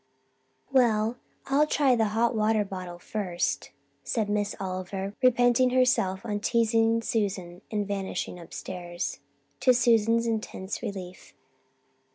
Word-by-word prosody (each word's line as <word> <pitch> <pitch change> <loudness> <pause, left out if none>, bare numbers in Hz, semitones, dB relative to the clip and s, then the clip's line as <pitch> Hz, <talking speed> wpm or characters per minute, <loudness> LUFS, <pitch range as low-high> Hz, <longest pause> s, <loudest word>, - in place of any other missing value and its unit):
"Well, 235 -3 +3 0.3
I'll 285 +3 +3
try 275 -4 +3
the 225 -2 +2
hot 230 +3 +1
water 215 -1 +2
bottle 185 -2 -7
first," 180 -1 -2 0.3
said 215 -4 -1
Miss 205 0 0
Oliver, 190 +1 -4
repenting 245 0 +4
herself 245 -6 +2
on 205 -2 -2
teasing 230 0 +2
Susan 185 -6 -2
and 210 -2 -2
vanishing 195 -3 -3
upstairs, 175 +1 -5 0.4
to 255 - +5
Susan's 230 -1 +3
intense 215 -3 -3
relief. 185 -2 -7
215 Hz, 115 wpm, -27 LUFS, 190-235 Hz, 0.4 s, to